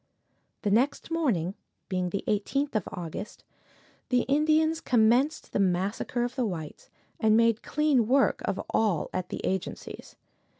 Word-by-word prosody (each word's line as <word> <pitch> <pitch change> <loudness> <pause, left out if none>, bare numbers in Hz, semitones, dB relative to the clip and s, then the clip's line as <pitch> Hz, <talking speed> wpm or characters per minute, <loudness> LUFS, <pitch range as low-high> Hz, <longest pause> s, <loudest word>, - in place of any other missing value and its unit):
The 205 - +1
next 270 +9 +1
morning, 225 - 0 0.3
being 185 -2 -1
the 195 +2 -3
18th 275 +8 0
of 215 -5 -1
August, 175 +3 -7 0.7
the 250 -1 +3
Indians 310 +4 +2
commenced 245 +5 +2
the - - +1
massacre 195 +6 0
of 245 0 -2
the 260 -1 -1
whites, 165 -8 -5 0.3
and 220 0 +4
made 230 -1 +3
clean 290 -7 +2
work 270 +3 +3
of - - -2
all 210 -8 +1
at 185 -1 -3
the - - -5
agencies. 190 -1 -4
225 Hz, 140 wpm, -28 LUFS, 190-275 Hz, 0.7 s, and